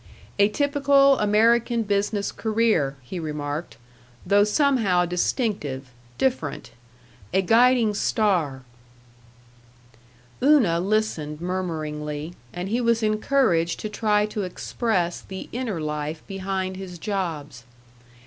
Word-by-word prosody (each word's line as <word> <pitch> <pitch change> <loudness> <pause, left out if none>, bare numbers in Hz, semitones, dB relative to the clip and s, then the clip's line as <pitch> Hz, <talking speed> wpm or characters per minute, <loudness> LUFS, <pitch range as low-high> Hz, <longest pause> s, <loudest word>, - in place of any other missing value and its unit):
A 200 +1 +5
typical 280 +2 +3
American 230 +3 +3
business 205 0 -1
career, 215 -11 +1
he 175 +9 -6
remarked, 150 -1 -4 0.5
though 200 +2 +4
somehow 210 -6 +2
distinctive, 175 - -2 0.3
different 150 - -2 0.6
A 190 - +3
guiding 230 +1 +4
star 180 - 0 1.8
Una 250 - +4
listened 180 -7 -1
murmuringly, 155 -3 -4 0.2
and 180 +2 -5
he 235 +4 0
was 235 -1 +2
encouraged 215 -6 +1
to 215 - -4
try 210 -1 +1
to 210 0 -4
express 185 -1 -2
the 190 -1 -8
inner 235 -7 -3
life 150 0 -4
behind 190 -1 -3
his 185 -2 -8
jobs. 160 - -4
195 Hz, 100 wpm, -24 LUFS, 165-225 Hz, 1.8 s, A